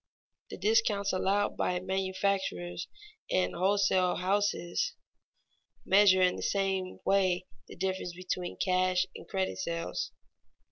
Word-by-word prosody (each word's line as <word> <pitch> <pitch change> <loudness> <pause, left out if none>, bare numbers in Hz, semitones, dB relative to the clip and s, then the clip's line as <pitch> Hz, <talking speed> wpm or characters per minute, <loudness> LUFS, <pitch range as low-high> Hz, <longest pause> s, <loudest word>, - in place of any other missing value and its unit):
The - - -7
discounts 205 -1 +2
allowed 200 +2 +1
by 180 0 0
manufacturers 190 - -2 0.4
and 185 - +1
wholesale 190 0 +2
houses 200 - 0 0.9
measure 190 -1 +6
in 180 - +3
the - - -6
same 190 -2 -1
way 185 -2 +2 0.2
the - - -11
difference 185 -1 -3
between 180 0 -4
cash 185 0 +2
and - - -10
credit 190 -1 -2
sales. 170 -2 -3
190 Hz, 110 wpm, -30 LUFS, 180-195 Hz, 0.9 s, measure